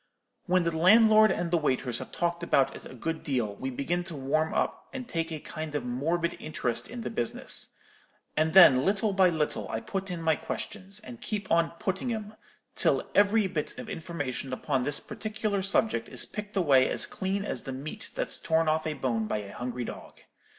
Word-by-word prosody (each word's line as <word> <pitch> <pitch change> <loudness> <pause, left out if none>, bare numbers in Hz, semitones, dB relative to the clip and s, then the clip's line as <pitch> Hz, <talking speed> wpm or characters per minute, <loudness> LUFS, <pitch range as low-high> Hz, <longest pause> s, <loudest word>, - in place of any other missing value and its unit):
When 185 0 +3
the 170 -1 -1
landlord 215 +5 +7
and 170 -1 -1
the 170 - +3
waiters 130 -4 0
have - - -8
talked 170 0 -1
about 140 -5 +2
it - - -10
a 130 - -10
good 160 +6 -3
deal, 120 -8 -1
we 130 - -3
begin 170 +7 -1
to 170 -3 -6
warm 150 +4 0
up, - - -1
and 260 -3 -6
take 165 -6 -2
a 155 - -4
kind 155 0 -6
of 140 -4 -2
morbid 165 +8 -1
interest 125 -6 -2
in 240 0 -6
the - - -4
business; 120 - -1 0.6
and 160 +3 +1
then, 135 -9 +9
little 200 +3 +1
by 190 -1 +5
little, 150 - -1
I 110 - -2
put 195 - -4
in 175 -2 -3
my 160 -1 +2
questions, 195 +6 -6
and 235 +2 -10
keep 205 -3 -4
on 165 0 +3
putting 210 +3 -2
'em 215 -2 -4 0.4
till - - +2
every 205 +1 +4
bit 160 -5 -3
of - - -7
information 145 -6 -4
upon 135 0 0
this 145 +3 0
particular 215 -2 -3
subject 190 - +1
is - - +1
picked 210 -1 -6
away 140 -8 +5
as - - +2
clean 195 +1 -2
as - - -1
the 135 - -6
meat 135 +4 -6
that's - - -2
torn 160 0 +1
off 155 +1 +1
a 155 - -2
bone 115 -6 -1
by - - -1
a 100 -1 -7
hungry 125 0 -4
dog. - - -9
165 Hz, 200 wpm, -28 LUFS, 135-195 Hz, 0.6 s, then